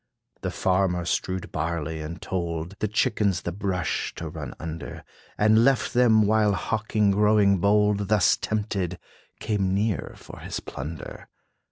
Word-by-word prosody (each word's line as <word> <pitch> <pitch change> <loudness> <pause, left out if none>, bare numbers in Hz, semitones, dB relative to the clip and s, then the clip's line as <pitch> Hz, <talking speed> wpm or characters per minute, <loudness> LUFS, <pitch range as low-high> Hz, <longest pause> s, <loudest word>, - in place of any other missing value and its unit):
The - - -2
Farmer 90 -2 +1
strewed 95 +1 -2
barley, 80 0 -3
and 80 +3 -6
toled 85 -1 -3
The 110 - 0
chickens 105 -3 +1
the 85 - -2
brush 90 -2 -2
to - - -5
run - - -7
under, 80 -1 -7 0.3
And 110 +2 +5
left 135 0 +2
them, 115 -3 +5
while 105 -1 +3
Hawk 110 +2 -3 0.2
growing 105 -1 +4
bold, 105 +1 +2
Thus 105 -4 +4
tempted, 100 -5 -2 0.4
came 95 -3 0
near 105 -1 -1
for - - -12
his - - -5
plunder. 75 +5 -8
100 Hz, 140 wpm, -25 LUFS, 85-105 Hz, 0.4 s, And